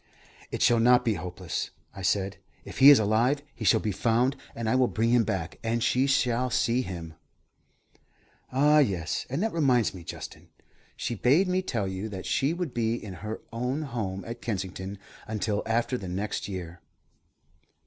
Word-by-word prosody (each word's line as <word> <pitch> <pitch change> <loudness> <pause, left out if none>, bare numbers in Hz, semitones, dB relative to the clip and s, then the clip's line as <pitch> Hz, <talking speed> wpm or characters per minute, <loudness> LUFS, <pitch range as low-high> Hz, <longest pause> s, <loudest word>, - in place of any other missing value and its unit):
"It - - -2
shall 120 -1 +5
not 125 +2 +5
be 115 - +3
hopeless," 90 -1 -4 0.2
I 95 - -8
said. 100 +1 0 0.3
"If - - -8
he 135 - +10
is 145 - +9
alive, 115 +7 +2
he 115 - -8
shall 100 - +5
be 105 - -2
found, 120 +6 +1 0.2
and 115 -1 -3
I 110 - +2
will 130 -1 +4
bring 115 +1 0
him 120 -1 +5
back, 90 -5 -3
and 115 0 0
she 130 +3 +2
shall 125 -2 +2
see 120 +1 +1
him." 85 -7 -6 1.4
"Ah, 150 +3 +5
yes; 95 - 0
and 140 +9 -1
that 225 - -1
reminds 130 -8 +2
me, 90 -3 -9
Justin, - - -9 0.5
she - - -3
bade 140 - +3
me 185 +1 +1
tell 115 - -2
you 95 +3 -4
that 95 -3 -7
she 135 +3 +1
would 170 -5 -3
be 115 -1 0
in 105 -5 -7
her 105 +1 -5
own 125 +6 -2
home 105 -8 -4
at 115 +1 -7
Kensington 95 -2 -4 0.3
until 105 -1 -1
after 120 +2 0
the 95 - -6
next 100 +3 -3
new 95 - -4
year." 85 -1 -7
115 Hz, 180 wpm, -27 LUFS, 95-125 Hz, 1.4 s, he